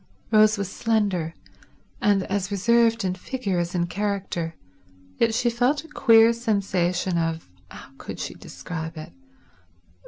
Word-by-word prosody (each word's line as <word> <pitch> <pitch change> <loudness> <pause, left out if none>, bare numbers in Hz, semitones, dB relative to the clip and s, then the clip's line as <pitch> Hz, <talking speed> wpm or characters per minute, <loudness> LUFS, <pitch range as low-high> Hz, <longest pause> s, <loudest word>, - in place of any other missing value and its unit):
Rose 215 0 +5
was 200 -1 -3
slender, 200 -8 0 0.7
and 205 -4 +3
as 195 0 -2
reserved 230 +2 +2
in 185 - 0
figure 195 -1 -3
as 175 +1 -3
in 170 -1 +1
character, 190 -3 -3 0.6
yet 230 - +3
she 245 +1 +1
felt 250 +5 +1
a - - -13
queer 230 -5 +5
sensation 190 -6 0
of—how 160 - -6
could - - -7
she - - -4
describe 160 -1 -7
it? 155 - -9
200 Hz, 130 wpm, -24 LUFS, 175-230 Hz, 0.7 s, Rose